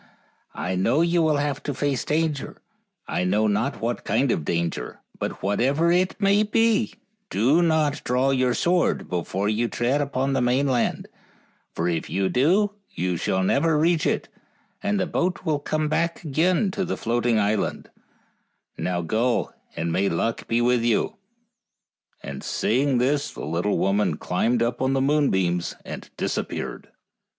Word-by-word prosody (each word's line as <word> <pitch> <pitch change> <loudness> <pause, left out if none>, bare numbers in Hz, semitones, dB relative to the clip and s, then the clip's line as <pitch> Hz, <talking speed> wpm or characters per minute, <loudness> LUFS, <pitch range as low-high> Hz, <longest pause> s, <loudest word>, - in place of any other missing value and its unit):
I 90 - -2
know 115 - +2
you 170 0 +2
will 155 -2 +2
have 145 0 -1
to 145 - -4
face 140 -2 -1
danger. 155 -2 -1 0.5
1 90 0 -1
know 105 +3 +2
not 110 +5 0
what 115 +1 -2
kind 120 +5 +1
of 80 - -1
danger; 85 -5 -2 0.2
but - - -4
whatever 135 - +2
it 185 +3 +1
may 200 0 +4
be 220 +1 +2 0.3
do 135 +11 +3
not 155 -3 +1
draw 125 +2 +1
your 130 -2 +2
sword 175 0 +1
before 90 +3 -2
you 110 +3 +1
tread 125 +5 0
upon 135 -1 -1
the 135 - +1
mainland, 125 0 +1 0.7
for 85 - -1
if 85 -2 -2
you 95 0 0
do 190 +11 +2 0.2
you 90 0 -2
shall 95 +3 0
never 150 - +2
reach 165 +1 +2
it, - - -1 0.5
and 205 0 0
the 185 - +1
boat 180 +1 -1
will 155 -3 +1
come 155 +1 -1
back 170 +3 -1
again 170 +6 +1
to 195 - -2
the 185 - -3
float 120 +1 -1
ing 115 -2 +3
island; 105 0 -1 0.9
and - - -4
now 90 -1 0
go 115 +7 0 0.2
and 85 +1 -2
may 95 +4 +1
luck 115 +7 -2
go 115 +1 +1
with 125 0 +3
you; 115 -2 +1 0.5
" - - -42
and 70 -1 -7
saying 130 +3 +1
this 140 +4 +1
the - - -7
little 85 +7 0
woman 100 -5 +1
climbed 115 +6 0
up 120 - -1
the 130 - +1
moonbeams 95 - +1
and - - -8
disappeared. - - -3
130 Hz, 160 wpm, -24 LUFS, 105-155 Hz, 0.9 s, may